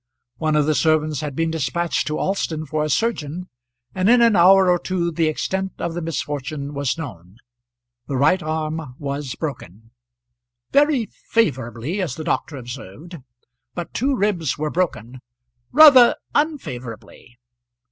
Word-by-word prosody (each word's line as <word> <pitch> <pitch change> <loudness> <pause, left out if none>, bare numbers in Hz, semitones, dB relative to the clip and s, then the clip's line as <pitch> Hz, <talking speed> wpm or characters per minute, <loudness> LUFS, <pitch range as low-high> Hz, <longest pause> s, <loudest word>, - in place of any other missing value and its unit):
One 155 +1 0
of 150 -1 +3
the 155 - +2
servants 155 +1 +1
had 145 -3 -5
been 165 +1 0
despatched 165 +3 -1
to 150 - -2
Alston 165 -5 -2
for 155 +1 -2
a 155 - -2
surgeon, 180 - -2 0.4
and 185 +2 +1
in 245 +1 +6
an 230 -2 +5
hour 190 +2 +6
or 175 -1 +3
two 175 -2 -2
the 165 -1 +1
extent 190 +5 -2
of 170 - -3
the 175 - -4
misfortune 145 -3 -4
was 140 +1 -1
known. 100 - -9 0.7
The 135 - -2
right 180 +8 +3
arm 155 -3 -4
was 140 -2 -4
broken 115 - -7 0.8
"very 285 -4 +3 0.2
favourably," 135 - 0
as 160 -8 -3
the 160 - -6
doctor 150 -1 -2
observed. 130 - -9 0.6
But 175 -1 -6
two 270 +3 0
ribs 190 - 0
were 150 0 -2
broken 130 - -2 0.5
"rather 275 -5 +8 0.2
unfavourably." 125 - -4
155 Hz, 145 wpm, -21 LUFS, 140-185 Hz, 0.8 s, rather